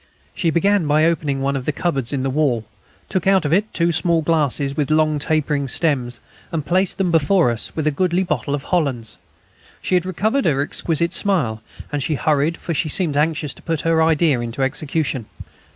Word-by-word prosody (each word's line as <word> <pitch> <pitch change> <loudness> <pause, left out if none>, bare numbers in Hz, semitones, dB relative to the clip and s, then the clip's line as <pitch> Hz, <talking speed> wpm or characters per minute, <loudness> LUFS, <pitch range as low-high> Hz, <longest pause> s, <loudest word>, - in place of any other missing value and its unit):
She 170 - 0
began 185 +1 +2
by 155 +2 +3
opening 150 -5 0
one 140 0 0
of 130 -2 -4
the - - +1
cupboards 140 -6 -2
in 135 -2 -2
the 135 - -1
wall, 130 -6 0 0.4
took 185 -1 -2
out 190 -4 +4
of 150 - +1
it 205 +4 +1
two 170 0 +1
small 165 0 +1
glasses 145 -3 0
with 145 -3 -1
long 155 -1 +2
tapering 145 -2 0
stems, 130 -5 -1 0.3
and 155 -3 -3
placed 185 +1 +1
them 190 -3 0
before 165 -2 +3
us, 115 - -5
with 155 - -2
a 155 - +3
goodly 180 +4 +1
bottle 145 -5 -1
of 140 - -6
Hollands. 130 - -2 0.6
She - - -3
had 180 0 +2
recovered 220 +9 0
her 140 -2 +2
exquisite 170 +3 -1
smile, 150 - 0 0.3
and 145 -1 -2
she 155 +2 -1
hurried, 150 +3 +1
for 170 - -4
she 155 +1 -1
seemed 160 -2 +1
anxious 150 -1 0
to - - -17
put 165 -3 -2
her 165 -1 +2
idea 160 -4 +3
into 120 +3 -3
execution. 140 -3 -2
155 Hz, 200 wpm, -20 LUFS, 140-170 Hz, 0.6 s, out